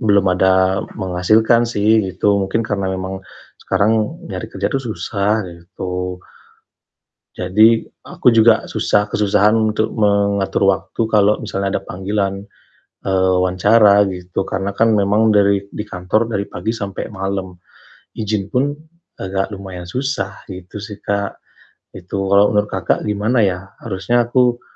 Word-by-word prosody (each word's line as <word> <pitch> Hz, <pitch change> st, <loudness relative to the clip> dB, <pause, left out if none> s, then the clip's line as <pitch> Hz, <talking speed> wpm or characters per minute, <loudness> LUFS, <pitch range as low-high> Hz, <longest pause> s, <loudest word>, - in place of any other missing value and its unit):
belum 100 Hz, -4 st, +3 dB
ada 95 Hz, +1 st, +3 dB, 0.2 s
menghasilkan 110 Hz, +6 st, +2 dB
sih 110 Hz, 0 st, +3 dB
gitu. 100 Hz, +2 st, +1 dB
Mungkin 115 Hz, 0 st, -1 dB
karena 100 Hz, -3 st, -2 dB
memang 95 Hz, 0 st, -4 dB, 0.4 s
sekarang 110 Hz, -, +1 dB, 0.2 s
nyari 90 Hz, -, -5 dB
kerja 100 Hz, 0 st, -3 dB
tuh 135 Hz, -, 0 dB
susah 105 Hz, -1 st, -1 dB
gitu. 90 Hz, +1 st, -6 dB, 1.2 s
Jadi 110 Hz, +5 st, +4 dB, 0.2 s
aku -, -, -3 dB
juga 110 Hz, 0 st, +4 dB
susah 105 Hz, 0 st, +1 dB
kesusahan 105 Hz, +1 st, +2 dB, 0.2 s
untuk 110 Hz, +1 st, 0 dB
mengatur 100 Hz, -2 st, +1 dB
waktu 100 Hz, +3 st, -1 dB
kalau 105 Hz, -1 st, +3 dB
misalnya 100 Hz, 0 st, -2 dB
ada -, -, -18 dB
panggilan, 100 Hz, +1 st, -2 dB, 0.6 s
eee, 95 Hz, -1 st, +2 dB
wawancara 100 Hz, +3 st, +4 dB
gitu. 90 Hz, +1 st, -4 dB
Karena 95 Hz, +1 st, -3 dB
kan 115 Hz, 0 st, +3 dB
memang 105 Hz, +3 st, +3 dB
dari 100 Hz, -1 st, +3 dB
di 105 Hz, -, -6 dB
kantor 100 Hz, +4 st, -1 dB
dari 100 Hz, -3 st, -2 dB
pagi 110 Hz, +2 st, -4 dB
sampai 100 Hz, -2 st, -5 dB
malam, 95 Hz, -2 st, -4 dB, 0.6 s
izin 105 Hz, -2 st, -3 dB
pun 130 Hz, +3 st, +2 dB, 0.5 s
agak 95 Hz, 0 st, -2 dB
lumayan 95 Hz, -4 st, -8 dB
susah 125 Hz, -5 st, -3 dB
gitu 90 Hz, +1 st, -9 dB
sih, 105 Hz, 0 st, -8 dB
Kak. 100 Hz, 0 st, -3 dB, 0.6 s
Itu 95 Hz, +2 st, -5 dB
kalau 100 Hz, +1 st, +4 dB
menurut 105 Hz, 0 st, +1 dB
Kakak, 95 Hz, -3 st, -1 dB
gimana 105 Hz, +4 st, +1 dB
ya 95 Hz, -1 st, -1 dB
harusnya 115 Hz, +3 st, 0 dB
aku 120 Hz, -1 st, +2 dB
100 Hz, 135 wpm, -18 LUFS, 95-110 Hz, 1.2 s, Jadi